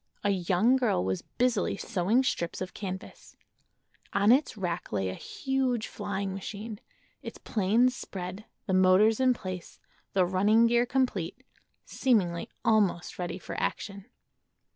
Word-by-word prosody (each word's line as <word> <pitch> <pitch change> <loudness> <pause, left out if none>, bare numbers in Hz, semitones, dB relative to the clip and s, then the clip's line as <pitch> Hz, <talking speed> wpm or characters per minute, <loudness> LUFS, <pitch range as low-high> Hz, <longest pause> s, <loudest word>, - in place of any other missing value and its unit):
A 205 - +2
young 190 +7 +3
girl 225 - +1
was 95 -1 -1
busily 240 -6 0
sewing 200 +8 +1
strips 170 -9 -2
of 185 0 -5
canvas. 190 -2 -8 0.8
On 200 +2 +4
its 260 -3 +3
rack 180 -3 -3
lay 95 -2 -1
a - - -3
huge 260 - -1
flying 200 -2 -4
machine—its 205 +2 -9
planes 230 +5 +2
spread, 190 +1 -7 0.2
the 190 - -1
motors 190 +4 +5
in 255 -1 +4
place, 185 -5 -7 0.3
the 185 -2 +4
running 205 +5 +4
gear 240 +1 +3
complete—seemingly 225 -3 -1 0.2
almost 205 -8 +2
ready 180 0 -3
for - - -8
action. 200 -2 -3
200 Hz, 125 wpm, -29 LUFS, 185-235 Hz, 0.8 s, motors